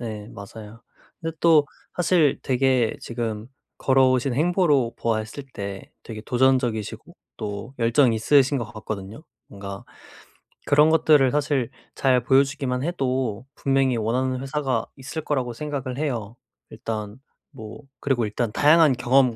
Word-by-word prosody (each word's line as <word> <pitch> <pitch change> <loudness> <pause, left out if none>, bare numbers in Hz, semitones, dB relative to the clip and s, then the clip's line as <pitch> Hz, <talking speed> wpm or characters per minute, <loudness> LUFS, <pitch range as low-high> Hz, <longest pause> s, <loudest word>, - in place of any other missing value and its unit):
네 110 -3 -6
맞아요. 110 +2 -11 0.4
근데 165 -1 -5
또 160 -3 +5 0.3
사실 170 -5 +3
되게 130 -3 +1
지금 115 -1 -4 0.3
걸어오신 130 -1 +3
행보로 150 -6 +2
보았을 110 +4 -3
때 100 -1 -7
되게 110 -2 -8
도전적이시고 125 -3 0 0.2
또 105 +5 -6
열정이 115 +1 +3
있으신 140 +4 +3
것 120 - -3
같거든요. 110 +2 -7 0.3
뭔가 100 0 -8 0.8
그런 150 +2 +5
것들을 150 -4 +4
사실 145 -4 0 0.3
잘 130 -2 +2
보여주기만 135 -1 +1
해도 130 -8 -2
분명히 135 -2 +1
원하는 125 +4 -1
회사가 135 -4 -1
있을 140 +4 -6
거라고 130 -5 -1
생각을 135 -1 -5
해요. 120 -8 -3 0.3
일단 105 0 -6 0.3
뭐 110 -1 -10 0.2
그리고 130 -5 0
일단 105 +2 -2
다양한 150 +3 +5
경험 125 0 +3
130 Hz, 290 characters per minute, -24 LUFS, 115-140 Hz, 0.8 s, 또